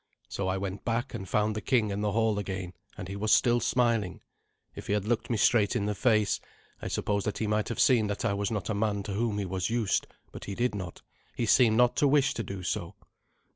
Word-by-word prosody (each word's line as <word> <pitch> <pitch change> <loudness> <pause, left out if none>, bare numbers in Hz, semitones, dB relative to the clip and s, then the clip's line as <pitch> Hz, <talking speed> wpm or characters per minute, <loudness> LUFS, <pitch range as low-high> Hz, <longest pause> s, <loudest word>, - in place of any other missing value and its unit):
So 100 - -3
I 95 0 0
went 95 +1 -5
back, 120 +3 -2
and 95 -5 -6
found 105 0 +1
the 110 - -3
king 110 -2 +1
in 100 +1 -2
the 105 -1 0
hall 110 -2 +1
again, 95 -2 -5 0.2
and 90 - -6
he 100 - -6
was 105 +2 -1
still 120 +1 +4
smiling. 115 -5 0 0.5
If - - -9
he - - 0
had 105 -1 0
looked 115 +1 -1
me 115 - 0
straight 105 0 +3
in 100 - 0
the 105 - 0
face, 105 -1 +2 0.4
I - - -4
suppose 100 -1 -1
that 105 - -3
he 110 - -1
might 105 0 0
have 115 - -4
seen 120 -5 +4
that 100 0 -3
I - - +1
was 100 0 -1
not 110 -1 -3
a - - 0
man 100 -1 -1
to 100 - -5
whom 110 0 -1
he 100 - -2
was 95 +1 -2
used, 115 -3 0 0.2
but - - -9
he 100 - -5
did 120 +1 0
not. 95 -4 -7 0.3
He 120 - -1
seemed 110 -1 +4
not 125 +1 +4
to 145 - +4
wish 140 0 +3
to - - -3
do 95 -3 -6
so. - - -3
105 Hz, 250 wpm, -28 LUFS, 100-115 Hz, 0.5 s, still